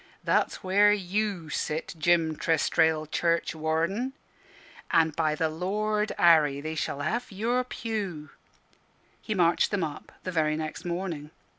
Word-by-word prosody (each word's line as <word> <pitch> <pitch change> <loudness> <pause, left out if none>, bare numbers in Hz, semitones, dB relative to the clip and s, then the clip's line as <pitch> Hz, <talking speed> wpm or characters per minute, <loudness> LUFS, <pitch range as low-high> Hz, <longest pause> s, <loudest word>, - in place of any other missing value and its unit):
That's - - +1
where 200 +2 +5
you 195 -4 -1
sit, 155 +1 -2
Jim 165 0 +2
Trestrail, 160 0 +2
churchwarden; 165 - 0 0.8
and 160 -2 +3
by 155 -2 +1
the 160 +1 +1
Lord 210 +6 -1
Harry, 155 -5 +5
they 155 +2 -4
shall 145 -2 -3
have 235 +11 -2
your 235 +6 0
pew." 205 -11 -5 0.9
He 215 - -3
marched 170 -2 +3
them 200 -4 -1
up 150 -2 -6
the 185 - -3
very 155 -3 +1
next 155 +1 -5
morning. 170 -4 -4
170 Hz, 130 wpm, -27 LUFS, 155-205 Hz, 0.9 s, where